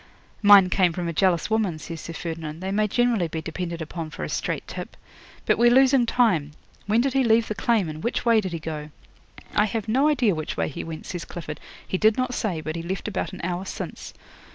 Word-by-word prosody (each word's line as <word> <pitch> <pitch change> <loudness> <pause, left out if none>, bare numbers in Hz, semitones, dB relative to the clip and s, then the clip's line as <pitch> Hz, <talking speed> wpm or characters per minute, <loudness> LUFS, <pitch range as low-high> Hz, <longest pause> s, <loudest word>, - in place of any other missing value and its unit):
'"Mine 200 -3 +7
came 180 -3 +3
from 175 0 -3
a 170 - -2
jealous 185 +3 +2
woman," 210 -7 +1
says 165 +1 -7
Sir 165 - -7
Ferdinand. 160 -1 -5
"They 190 +1 -3
may 210 +1 +2
generally 235 -4 +1
be 160 0 -4
depended 170 +1 -4
upon 160 0 -6
for - - -7
a - - -3
straight - - -3
tip. - - -7 0.5
But - - +2
we're 240 0 +6
losing 260 0 +5
time. 180 - +2 0.3
When 220 +3 +3
did 265 0 0
he 270 -1 +3
leave 225 -1 +3
the - - -2
claim, 220 -4 +1
and 155 +2 -7
which 235 - -1
way 230 -2 +5
did 190 -3 -4
he 170 - -3
go?" 155 -1 -6 0.6
'"I 210 - +4
have 220 0 -3
no 265 +7 +3
idea 250 -9 +3
which 155 -2 -4
way - - 0
he 140 - -6
went," 160 -1 -7
says 175 -3 -5
Clifford. 155 -2 -7 0.3
"He 185 - -2
did 220 0 +4
not 255 -1 -1
say, 190 -10 -2
but 155 +1 -4
he 165 - -3
left 185 +5 -4
about 210 - -3
an 190 - -8
hour 175 +1 -2
since." 195 - -7
190 Hz, 230 wpm, -24 LUFS, 165-225 Hz, 0.6 s, Mine